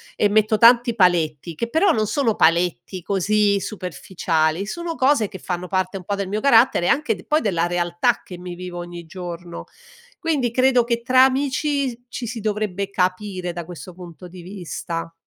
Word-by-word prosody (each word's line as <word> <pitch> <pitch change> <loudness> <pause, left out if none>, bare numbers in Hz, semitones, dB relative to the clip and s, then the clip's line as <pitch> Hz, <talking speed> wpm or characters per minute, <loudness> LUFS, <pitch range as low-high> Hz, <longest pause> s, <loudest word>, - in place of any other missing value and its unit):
e 210 - +3
metto 215 +1 +2
tanti 235 +2 +6
paletti, 170 - +1
che 230 +9 -3
però, 335 +8 +3
non 215 -8 +1
sono 235 -4 +1
paletti 170 +1 +1
così 200 +2 +1
superficiali, 180 -3 -2
sono 340 +6 -4
cose 260 -6 +2
che 195 - -8
fanno 180 0 -4
parte 185 +1 -1
un 185 - -9
po' 200 +3 -2
del 200 -1 -3
mio 210 +3 -2
carattere 230 -8 +4
anche 300 +2 +1
de - - -13
poi 305 +1 +2
della 175 -5 0
realtà 175 +6 0
che 180 - -10
mi 180 0 -7
vivo 180 0 -7
ogni 175 -1 -8
giorno, 175 0 -8 0.5
quindi 285 -8 0
credo 255 0 +3
che 235 0 -1
tra 255 +1 +5
amici 270 -1 -1
ci 245 - -5
si 235 +1 -5
dovrebbe 205 -2 -2
capire 185 -1 -2
da 170 0 -5
questo 175 +1 -10
punto 180 0 -11
di 180 0 -12
vista. 170 -2 -6
195 Hz, 175 wpm, -21 LUFS, 175-235 Hz, 0.5 s, tanti